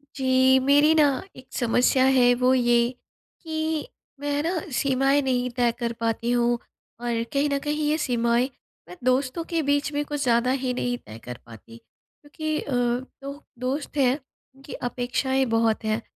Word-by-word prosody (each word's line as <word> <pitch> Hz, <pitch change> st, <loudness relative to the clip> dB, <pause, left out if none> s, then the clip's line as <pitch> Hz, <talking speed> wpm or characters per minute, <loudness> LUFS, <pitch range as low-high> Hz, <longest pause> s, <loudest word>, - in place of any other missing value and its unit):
जी, 260 Hz, 0 st, +4 dB
मेरी 290 Hz, +4 st, +5 dB
न 290 Hz, -, +6 dB, 0.3 s
एक 255 Hz, 0 st, -13 dB
समस्या 250 Hz, +2 st, +2 dB
है 245 Hz, 0 st, +5 dB
वो 250 Hz, +1 st, +3 dB
ये 240 Hz, -1 st, +3 dB, 0.5 s
कि 315 Hz, -2 st, -2 dB, 0.3 s
मैं 290 Hz, 0 st, -3 dB
है 290 Hz, -, 0 dB
न 345 Hz, +1 st, -2 dB
सीमाएँ 270 Hz, +2 st, +2 dB
नहीं 250 Hz, -2 st, 0 dB
तय 240 Hz, -1 st, +3 dB
कर 235 Hz, -1 st, -2 dB
पाती 230 Hz, +1 st, -1 dB
हूँ। 240 Hz, 0 st, +2 dB, 0.4 s
और 235 Hz, -1 st, -1 dB
कहीं 285 Hz, +1 st, +2 dB
न 280 Hz, -, +1 dB
कहीं 300 Hz, 0 st, -1 dB
ये 310 Hz, -, +2 dB
सीमाएँ 240 Hz, -2 st, +1 dB, 0.4 s
मैं 180 Hz, -, -9 dB
दोस्तों 255 Hz, +5 st, +1 dB
के 335 Hz, -2 st, 0 dB
बीच 285 Hz, +1 st, +1 dB
में 290 Hz, 0 st, 0 dB
कुछ 290 Hz, -1 st, -3 dB
ज़्यादा 240 Hz, 0 st, +2 dB
ही 260 Hz, -1 st, -1 dB
नहीं 245 Hz, 0 st, -2 dB
तय 110 Hz, -, -12 dB
कर 125 Hz, -1 st, -7 dB
पाती 115 Hz, 0 st, -13 dB
क्योंकि 305 Hz, -, -7 dB
अ, -, -, -7 dB
2 255 Hz, +4 st, -3 dB, 0.2 s
दोस्त 270 Hz, +4 st, -3 dB
हैं 260 Hz, -3 st, +4 dB, 0.4 s
उनकी 270 Hz, +1 st, -11 dB
अपेक्षाएँ 255 Hz, +2 st, -1 dB
बहुत 225 Hz, -1 st, +1 dB
हैं। 215 Hz, +1 st, 0 dB
260 Hz, 165 wpm, -25 LUFS, 240-285 Hz, 0.5 s, न